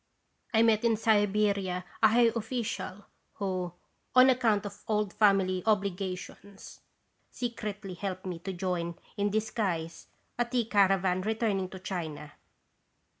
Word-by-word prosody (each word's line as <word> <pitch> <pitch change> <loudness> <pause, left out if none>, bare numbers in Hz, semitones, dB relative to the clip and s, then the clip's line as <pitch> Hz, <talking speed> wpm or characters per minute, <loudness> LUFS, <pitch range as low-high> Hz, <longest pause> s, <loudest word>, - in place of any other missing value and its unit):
I 225 -2 +4
met 225 -1 +3
in 230 -2 +3
Siberia 205 -4 +1 0.2
a 220 - +8
high 230 +1 +4
official, 225 -4 -4 0.3
who, 185 -3 -2 0.4
on 255 +1 +8
account 225 -5 +2
of 200 0 -8
old 210 -2 0
family 195 -3 +3
obligations, 195 -1 -3 0.5
secretly 210 -5 -5
helped 185 +1 -5
me 180 -3 -4
to 190 +3 -5
join, 175 -2 -2 0.2
in 205 0 +1
disguise, 195 -6 -2 0.3
a 240 - +3
tea 240 -1 0
caravan 195 -3 +3
returning 210 -3 0
to 190 - -8
China. 165 -6 -5
200 Hz, 125 wpm, -29 LUFS, 185-220 Hz, 0.5 s, a